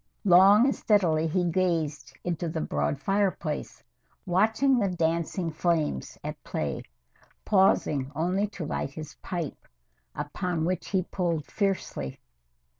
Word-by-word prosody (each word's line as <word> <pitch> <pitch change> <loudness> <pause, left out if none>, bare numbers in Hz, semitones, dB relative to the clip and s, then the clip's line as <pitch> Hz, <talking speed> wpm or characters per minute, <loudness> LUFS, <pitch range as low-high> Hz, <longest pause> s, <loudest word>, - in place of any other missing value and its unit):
Long 195 +5 +7
and 270 - +2
steadily 165 -7 +2
he 180 +3 +1
gazed 165 -6 0
into 170 -1 -2
the - - -3
broad 75 -1 -1
fireplace, 195 -6 -1 0.4
watching 220 +8 +3
the 200 -3 +1
dancing 170 0 -1
flames 155 - -1
at - - -6
play, 70 -3 -3 0.6
pausing 155 -9 +3
only 180 +6 +1
to 195 -5 -6
light 145 - -2
his 155 +2 -8
pipe, 170 -5 -5 0.5
upon 160 +3 -2
which 180 0 -2
he 190 -2 +1
pulled 170 -4 -2
fiercely. 195 - -2
175 Hz, 120 wpm, -27 LUFS, 155-190 Hz, 0.6 s, Long